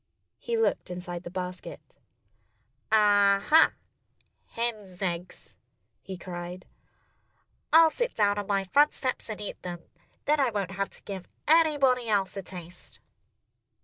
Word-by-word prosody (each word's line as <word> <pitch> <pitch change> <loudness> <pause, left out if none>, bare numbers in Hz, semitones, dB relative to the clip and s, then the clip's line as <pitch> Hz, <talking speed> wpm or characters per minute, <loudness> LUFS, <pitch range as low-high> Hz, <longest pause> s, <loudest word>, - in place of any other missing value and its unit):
He 470 -1 -2
looked 450 - 0
inside 180 -1 -6
the 175 - -8
basket. 180 0 -7 0.9
"Ah, 205 -2 +5
ha! 320 +1 +6 0.7
Hens' 215 -6 -4
eggs!" 180 -2 -5 0.5
he 190 0 -8
cried. 175 0 -7 1.1
"I'll 325 0 +7
sit 485 +5 -2
down 205 -1 +2
on 205 - -5
my 200 -2 +1
front 290 +10 +3
steps 255 -3 -3
and 215 - -5
eat 205 - -6
them. 175 -1 -6 0.4
Then 300 +1 +2
I 270 -3 +3
won't 200 -4 -3
have 195 +1 -2
to - - -13
give 190 -3 -7 0.2
anybody 285 -7 +4
else 195 -3 +1
a 195 - -4
taste." 180 -1 -11
200 Hz, 135 wpm, -28 LUFS, 180-250 Hz, 1.1 s, I'll